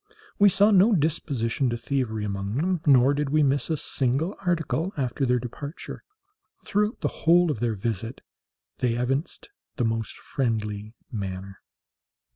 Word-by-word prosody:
We 205 0 +7
saw 200 +3 +4
no 205 +3 +6
disposition 140 - 0
to 120 - -2
thievery 115 -4 -2
among 100 +1 -3
them, 175 +4 0
nor 135 0 +6
did 145 0 -1
we 155 +1 +3
miss 140 +2 +1
a 160 - +1
single 140 - 0
article 170 0 0
after 135 0 -1
their 125 0 +3
departure. 135 +6 -7 0.6
Throughout 210 +3 0
the - - +1 0.2
whole 175 -1 +6
of 120 - -4
their 115 -1 0
visit 115 +3 -4 0.6
they 120 -2 +1
evinced 135 - -2 0.2
the 125 - 0
most 115 -1 -2
friendly 110 -4 -3 0.2
manner. 95 -2 -5
135 Hz, 145 wpm, -26 LUFS, 115-160 Hz, 0.6 s, We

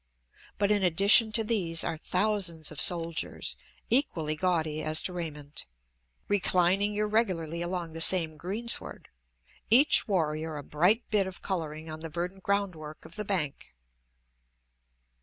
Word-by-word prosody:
But 200 0 +1
in 205 -1 +2
addition 200 +5 +4
to 225 - +3
these 185 -7 0
are - - -2
thousands 180 -2 -1
of 155 - -5
soldiers, 170 -2 0 0.3
equally 165 - +1
gaudy 160 -3 -1
as 155 0 +1
to 180 - -1
raiment, 150 - -6 0.6
reclining 195 +1 +1
irregularly 195 -7 -1
along 175 -2 -4
the 165 - -4
same 165 -2 +6
greensward, 205 +9 -1 0.6
each 265 +5 +5
warrior 160 -5 -2
a 145 - -7
bright 180 - +1
bit 200 -3 +2
of 190 - -10
coloring 160 -4 -4
on 155 0 -7
the 165 0 -7
verdant 175 +4 -5
groundwork 180 -7 -3
of - - -12
the 210 - -4
bank. 150 - -3
175 Hz, 135 wpm, -28 LUFS, 160-200 Hz, 0.6 s, same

